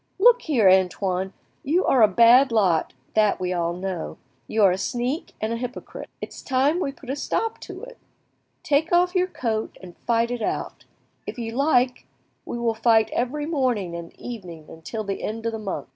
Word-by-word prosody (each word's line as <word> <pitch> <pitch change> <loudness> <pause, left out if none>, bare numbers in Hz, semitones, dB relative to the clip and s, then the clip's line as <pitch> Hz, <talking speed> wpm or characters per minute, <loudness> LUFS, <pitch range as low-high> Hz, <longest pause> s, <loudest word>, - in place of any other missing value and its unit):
"Look 485 +4 +6
here, 250 - +2
Antoine, 190 0 +2 0.3
you 330 +7 +1
are 255 - +4
a 215 - +8
bad 235 +6 +6
lot, 190 -8 +2 0.2
that 215 -1 +3
we 185 0 -1
all 170 -1 -1
know; 180 -1 -5 0.3
you 220 -1 +1
are 195 - +6
a 180 - -1
sneak 245 - -3
and 220 +1 -2
a - - -2
hypocrite. 250 +1 -7
It's - - -7
time 275 +5 +1
we 275 - -1
put 270 -1 -8
a - - -2
stop 450 +9 -2
to - - -9
it. - - -11 0.6
Take 300 +2 +1
off 355 +1 +3
your 365 -1 +2
coat 225 -10 -3
and 180 -2 -12
fight 235 0 0
it 245 -1 -3
out. - - -3 0.4
If - - -5
you 230 -2 -4
like, 255 -1 +1 0.4
we - - -5
will 235 -1 0
fight 225 -1 +3
every 280 +5 -1
morning 250 - -1
and 170 -1 -7
evening 170 -9 -9
till 220 +5 -4
the 195 -1 -4
end 225 +1 -4
of 230 - 0
the 220 - -5
month." 195 -10 -5
230 Hz, 190 wpm, -24 LUFS, 195-275 Hz, 0.6 s, a